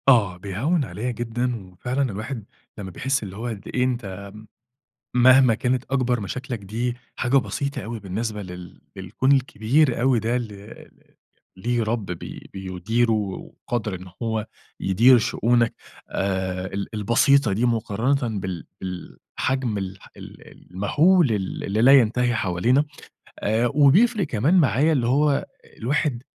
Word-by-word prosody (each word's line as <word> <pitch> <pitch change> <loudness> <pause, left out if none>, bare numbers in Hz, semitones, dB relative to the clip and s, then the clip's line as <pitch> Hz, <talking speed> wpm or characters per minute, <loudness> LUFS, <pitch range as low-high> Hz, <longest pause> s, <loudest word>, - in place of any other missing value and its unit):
آه، 105 -9 +4
بيهوّن 115 - -1
عليَّ 125 +1 -4
جدًا، 120 +2 -2 0.2
وفعلًا 125 +9 -3
الواحد 110 +3 -5 0.3
لمّا 95 -3 -6
بيحس 135 +7 -1
اللي 95 -2 -7
هو 115 +3 -4
قد 110 -5 -6
إيه 125 - +2
أنت 100 -6 -3
م 105 +1 -12 0.8
مهما 130 -1 +7
كانت 125 +2 0
أكبَر 125 -3 +1
مشاكلك 120 +4 -5
دي 115 +5 -3 0.2
حاجة 125 +3 +2
بسيطة 140 +1 -2
أوي 115 0 -5
بالنسبة 105 +2 -4
لل 90 -2 -10
للكون 95 +8 0
الكبير 130 0 +2
أوي 125 -2 +3
ده، 115 +3 -1
اللي 115 -4 -3 0.4
ل - - -31 0.4
ليه 120 +4 0
رَب 110 -1 -2
بي 90 -2 -8
بيُديره 95 +5 -1
وقادر 105 +1 -3
إن 90 +1 -10 0.2
هو 110 -1 -2 0.3
يدير 115 +7 +5
شؤونك 120 +1 +1 0.4
آآ 95 -1 -2
ال 100 0 -3
البسيطة 115 +3 +3
دي 115 +5 +1
مقارنةً 115 +1 0
بال 95 -3 -5 0.2
بالحجم 110 +6 -3
الح 95 0 -6
ال - - -12 0.2
المهُول 145 - +3
ال 100 -3 -2
اللي 105 +3 0
لا 135 +3 +8
ينتهي 120 +1 +1
حوالينا 115 +8 +2 0.5
آآ، 110 +3 +1
وبيفرِق 190 - +5
كمان 130 - +1
معايا 155 -2 +4
اللي 125 -5 +1
هو 140 +2 +2 0.3
الواحد 130 0 -1
115 Hz, 140 wpm, -23 LUFS, 100-130 Hz, 0.8 s, لا